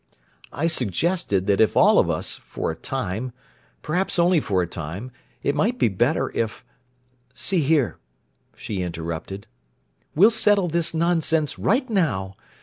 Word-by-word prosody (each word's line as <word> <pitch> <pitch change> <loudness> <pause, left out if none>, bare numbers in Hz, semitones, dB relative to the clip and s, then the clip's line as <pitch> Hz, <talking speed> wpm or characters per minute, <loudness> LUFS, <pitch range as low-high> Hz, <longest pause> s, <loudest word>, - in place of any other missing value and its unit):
"I 155 - -2
suggested 145 - 0
that 100 0 +2
if 110 - +3
all - - +6
of - - +2
us—for - - -3
a - - -6
time—perhaps 130 - -4
only 175 0 +4
for 95 -9 0
a - - -4
time—it 105 - -6
might 210 +12 0
be 120 - +3
better 120 - 0
if—" 110 -2 -3 0.7
"See 130 +9 0
here," 145 -4 +1 0.6
she 100 -3 -4
interrupted. 85 +3 -5 0.7
"We'll 200 +9 +6
settle 205 -4 +3
this 170 0 0
nonsense 160 -2 +1
right 255 +6 +1
now. 115 - 0
145 Hz, 130 wpm, -23 LUFS, -, 0.7 s, all